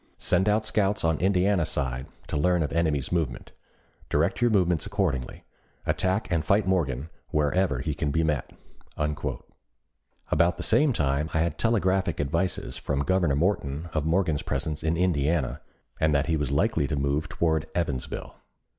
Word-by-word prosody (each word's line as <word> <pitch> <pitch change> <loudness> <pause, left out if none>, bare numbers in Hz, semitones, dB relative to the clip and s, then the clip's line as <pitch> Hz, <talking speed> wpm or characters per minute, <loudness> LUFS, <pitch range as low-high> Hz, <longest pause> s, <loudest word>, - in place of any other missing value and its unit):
Send 95 +3 +2
out 110 +1 +2
scouts 105 -1 +1
on 80 -2 +1
Indiana 95 0 +2
side 65 -4 -2 0.2
to - - -5
learn 90 +3 +2
of 75 - -3
enemy's 80 -5 0
movement. 80 -8 -2 0.6
Direct 80 +10 +1
your 120 - +4
movements 90 -7 +2
accordingly. 85 -11 -2 0.4
Attack 95 +4 0
and 85 -2 +1
fight 100 +5 +2
Morgan 80 -6 0 0.2
wherever 75 -2 +1
he 75 - -2
can 75 0 -2
be 80 +3 +1
met." 75 -5 -1 1.8
About 85 +3 +3
the - - -3
same 150 -1 +4
time 75 - 0
I 80 - +3
had 80 -3 -1
telegraphic 95 -6 +1
advices 75 -2 -1
from 70 0 -1
Governor 85 -2 +2
Morton 80 -2 -1
of 80 -1 0
Morgan's 80 -3 +1
presence 80 -2 -2
in 80 +1 +1
Indiana, 80 -5 +1 0.4
and 80 -1 +3
that 70 +1 +2
he 80 - +1
was 75 -3 -1
likely 70 0 +1
to 75 - -1
move 70 +2 -1
toward 80 -2 0
Evansville. 75 -7 -3
80 Hz, 155 wpm, -26 LUFS, 75-95 Hz, 1.8 s, your